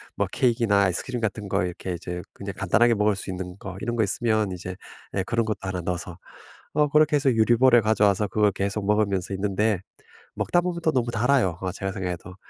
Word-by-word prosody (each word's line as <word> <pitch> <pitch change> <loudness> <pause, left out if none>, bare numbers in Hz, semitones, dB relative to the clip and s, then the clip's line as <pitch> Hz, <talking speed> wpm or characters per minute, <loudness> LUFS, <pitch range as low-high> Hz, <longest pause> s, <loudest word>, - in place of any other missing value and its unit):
뭐 - - 0
케이크나 115 -5 +2
아이스크림 115 +7 -1
같은 105 -2 -3
거 - - +1
이렇게 90 +1 -5
이제 90 +1 -5
그냥 100 0 -7
간단하게 115 +5 +3
먹을 105 -1 +2
수 95 - -5
있는 90 -1 -6
거 95 -2 -8
이런 120 +1 -2
거 110 - +2
있으면 110 -1 0
이제 90 +1 -6 0.4
예 95 - +1
그런 115 +1 0
것도 110 - -2
하나 95 -2 -3
넣어서 90 0 -4 0.6
어 150 -1 +2
그렇게 150 0 +4
해서 140 -2 +3
유리 115 +1 +4
볼에 125 -1 +6
가져와서 105 -1 +2
그걸 105 0 +2
계속 100 +1 -2
먹으면서 100 -3 +1
있는데 100 0 0 0.6
먹다 175 - +1
보면 175 -1 -2
또 160 - +3
너무 120 -3 0
달아요 115 -6 +2
어 95 -1 -2
제가 95 0 -4
생각해도. 90 -2 -5
105 Hz, 430 characters per minute, -25 LUFS, 95-120 Hz, 0.6 s, 볼에